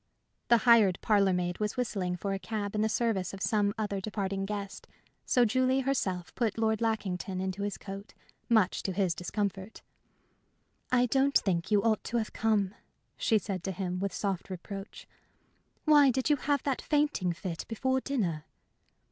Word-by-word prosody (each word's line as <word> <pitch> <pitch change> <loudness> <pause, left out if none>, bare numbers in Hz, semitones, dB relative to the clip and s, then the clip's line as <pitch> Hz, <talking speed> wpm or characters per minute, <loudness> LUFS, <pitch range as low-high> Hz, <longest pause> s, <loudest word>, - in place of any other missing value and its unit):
The 235 - +6
hired 220 -6 +6
parlor 200 -3 +3
maid 180 -1 -1
was 210 +2 -2
whistling 195 -7 -1
for 195 +2 -3
a 195 - -2
cab 205 -1 -4
in 210 - 0
the 220 - +2
service 210 -6 0
of 195 - -11
some 205 -2 +2
other 205 -3 -2
departing 195 -1 -3
guest; 200 -1 -5 0.4
so 245 -1 +4
Julie 255 +3 +2
herself 190 -10 -1
put 230 -4 -1
Lord 220 -1 +1
Lackington 195 -4 -1
into 190 +1 -3
his 205 0 -2
coat, 195 +1 -9 0.3
much 220 -5 +3
to 190 - -3
his 185 -2 +1
discomfort. 195 +3 -4 1.1
"I 250 -1 +4
don't 270 +3 +3
think 180 -2 -1
you 205 -1 +3
ought 220 -2 +2
to 240 - -1
have 220 -2 -2
come," 210 -3 +1 0.4
she 225 - +2
said 195 -3 -4
to 195 - -1
him, 180 -1 -3
with 200 0 -1
soft 195 -3 -3
reproach. 195 +2 -8 0.8
"Why 295 -3 +7
did 260 +4 +1
you - - +6
have 285 0 0
that 275 -3 -1
fainting 290 - +1
fit 170 0 -5
before 260 +4 0
dinner?" 180 - -2
205 Hz, 170 wpm, -30 LUFS, 190-235 Hz, 1.1 s, Why